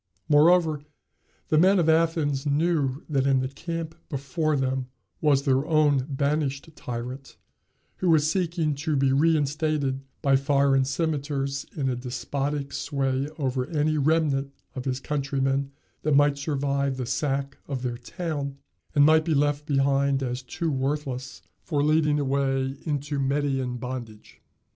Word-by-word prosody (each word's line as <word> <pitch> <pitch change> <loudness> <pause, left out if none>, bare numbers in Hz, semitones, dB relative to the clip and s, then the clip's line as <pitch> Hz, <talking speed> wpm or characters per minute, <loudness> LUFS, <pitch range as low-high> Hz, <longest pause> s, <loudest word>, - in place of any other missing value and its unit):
Moreover, 155 0 +4 0.7
the 155 - +4
men 190 +4 +5
of 170 -3 +2
Athens 160 -3 +2
knew 145 -2 +1
that 140 -3 +1
in 135 -1 +4
the 130 - -1
camp 165 +3 -5 0.2
before 150 +2 -1
them 130 -1 -1 0.3
was 145 -3 +3
their 135 -1 +2
own 145 -4 +3
banished 140 +1 -1
tyrant, 125 +3 -6 0.6
who 185 - 0
was 155 -2 +4
seeking 170 -3 0
to 155 +1 -1
be 135 -1 +2
reinstated 150 -2 +1 0.2
by 135 -1 +4
foreign 140 -1 +3
cimeters 140 -2 -2
in 140 - -1
despotic 140 +3 -3
sway 135 0 -1
over 130 -3 -1
any 155 -1 0
remnant 140 -2 +1 0.2
of 130 - -6
his 130 -1 -1
countrymen 135 -1 -1 0.3
that 150 -2 +2
might 145 0 +4
survive 140 -2 -1
the 130 - -3
sack 140 +1 -2
of 135 -3 -4
their 120 -2 -3
town, 145 -1 -4 0.4
and 145 -1 +6
might 155 +1 +5
be 160 -1 0
left 145 +1 +1
behind 140 -1 +2
as 125 0 -3
too 160 +6 -3
worthless 135 -2 -3 0.2
for 145 -4 -1
leading 150 -1 +3
away 135 -1 0
into 145 -1 -2
Median 135 -2 0
bondage. 120 -3 -8
140 Hz, 140 wpm, -26 LUFS, 135-155 Hz, 0.7 s, and